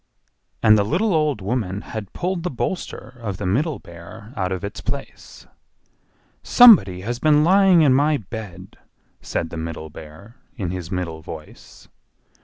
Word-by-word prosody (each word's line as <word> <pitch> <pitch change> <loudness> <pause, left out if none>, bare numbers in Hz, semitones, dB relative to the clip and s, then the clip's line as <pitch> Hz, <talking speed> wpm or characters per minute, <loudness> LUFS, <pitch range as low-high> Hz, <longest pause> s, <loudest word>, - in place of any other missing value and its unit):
And 110 -1 +6
the - - +3
little 180 - 0
old 150 -8 +1
woman 100 -2 -2
had 110 -4 -7
pulled 180 0 -3
the 180 - -2
bolster 130 -1 -5
of 100 -5 -4
the 100 - -5
Middle 135 - 0
Bear 85 +7 -13
out 95 -4 -2
of 95 +1 -4
its 100 - -6
place. - - -7 1.0
"SOMEBODY 135 - +6
HAS 120 +4 -4
BEEN 150 0 +4
LYING 185 -1 +5
IN 140 -4 +5
MY 145 +3 +3
BED!" 95 -4 -9 0.4
said 80 - -3
the 85 - -6
Middle 80 -1 -6
Bear, 80 - -13 0.2
in 95 -6 -3
his 90 -2 -6
middle 85 -4 -4
voice. 80 -1 -12
110 Hz, 155 wpm, -21 LUFS, 90-150 Hz, 1.0 s, And